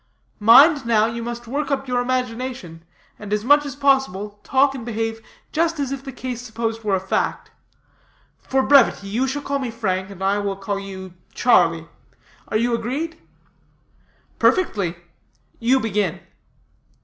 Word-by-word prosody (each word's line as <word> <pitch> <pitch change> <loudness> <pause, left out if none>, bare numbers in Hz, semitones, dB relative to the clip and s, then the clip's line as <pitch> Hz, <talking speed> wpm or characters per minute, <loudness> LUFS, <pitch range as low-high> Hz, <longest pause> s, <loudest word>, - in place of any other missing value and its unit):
Mind, 275 +8 +7
now, 220 -2 +4
you 230 +1 -3
must 240 +1 -6
work 280 +6 -3
up 270 -1 -2
your 250 -1 0
imagination, 250 -8 -3 0.4
and, 210 -1 -9
as 210 +1 -1
much 290 +2 +5
as 280 - -6
possible, 265 -8 0
talk 270 +1 +3
and 260 -4 -7
behave 225 -1 -3 0.3
just 330 0 0
as 275 -2 -2
if 275 -1 -5
the 270 - -7
case 250 -2 -6
supposed 225 -1 -4
were 205 -2 +1
a - - 0
fact. 190 +1 -2 0.9
For 265 0 0
brevity, 260 -8 +4
you 240 +6 0
shall 285 +2 -3
call 280 0 -1
me 260 -3 -3
Frank, 190 -5 -2
and 190 -1 -8
I 200 +1 +2
will 200 -1 -2
call 200 +1 -3
you 190 -2 -8 0.2
Charlie. 165 -9 +3 0.6
Are 215 - 0
you 235 +2 +1
agreed?" 280 +9 -3 1.2
"Perfectly. 200 - +2 0.6
You 250 +3 +3
begin." 205 -6 -1
235 Hz, 155 wpm, -21 LUFS, 205-270 Hz, 1.2 s, Mind